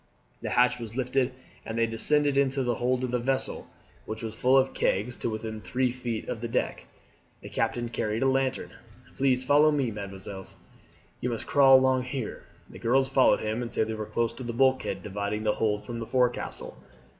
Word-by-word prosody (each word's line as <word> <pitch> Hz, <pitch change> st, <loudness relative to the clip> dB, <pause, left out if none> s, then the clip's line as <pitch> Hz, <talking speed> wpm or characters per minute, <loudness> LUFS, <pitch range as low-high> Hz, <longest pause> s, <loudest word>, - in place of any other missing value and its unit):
The -, -, -3 dB
hatch 125 Hz, 0 st, +3 dB
was 115 Hz, 0 st, -7 dB
lifted 130 Hz, 0 st, +1 dB, 0.3 s
and 115 Hz, -, -5 dB
they 115 Hz, -, +3 dB
descended 145 Hz, +5 st, +3 dB
into 135 Hz, -1 st, +2 dB
the 120 Hz, -1 st, +1 dB
hold 125 Hz, +2 st, 0 dB
of 125 Hz, -, -2 dB
the 125 Hz, -, +1 dB
vessel, 130 Hz, +2 st, -1 dB, 0.4 s
which 110 Hz, +1 st, -5 dB
was 110 Hz, -1 st, -4 dB
full 130 Hz, +4 st, +3 dB
of 135 Hz, 0 st, +2 dB
kegs 105 Hz, +6 st, 0 dB
to -, -, -2 dB
within 110 Hz, 0 st, -5 dB
three 125 Hz, +1 st, 0 dB
feet 120 Hz, -3 st, -4 dB
of 115 Hz, -, -4 dB
the 120 Hz, -, -2 dB
deck. 115 Hz, -, -2 dB, 0.5 s
The -, -, -9 dB
captain 120 Hz, -1 st, -1 dB
carried 110 Hz, 0 st, -2 dB
a -, -, +3 dB
lantern. 135 Hz, 0 st, 0 dB, 0.4 s
"Please 130 Hz, -1 st, +2 dB
follow 145 Hz, +3 st, +5 dB
me, 140 Hz, -5 st, 0 dB
mesdemoiselles, 95 Hz, -2 st, -7 dB, 0.6 s
you 125 Hz, -, -2 dB
must 115 Hz, -2 st, -3 dB
crawl 135 Hz, -2 st, +7 dB
along 130 Hz, -1 st, +2 dB
here." 125 Hz, -3 st, -5 dB, 0.2 s
The -, -, -12 dB
girls 130 Hz, +3 st, +2 dB
followed 135 Hz, -1 st, +4 dB
him 110 Hz, +2 st, -2 dB
until 120 Hz, -2 st, -1 dB
they 110 Hz, -, -4 dB
were 110 Hz, -1 st, -5 dB
close 115 Hz, -1 st, -1 dB
to 125 Hz, +2 st, -8 dB
the 120 Hz, -1 st, -4 dB
bulkhead 130 Hz, +2 st, +1 dB
dividing 105 Hz, +1 st, -3 dB
the 105 Hz, -1 st, +2 dB
hold 105 Hz, -2 st, -1 dB
from 120 Hz, -1 st, -5 dB
the 115 Hz, -, -5 dB
forecastle. 125 Hz, -2 st, -1 dB
120 Hz, 195 wpm, -27 LUFS, 110-130 Hz, 0.6 s, crawl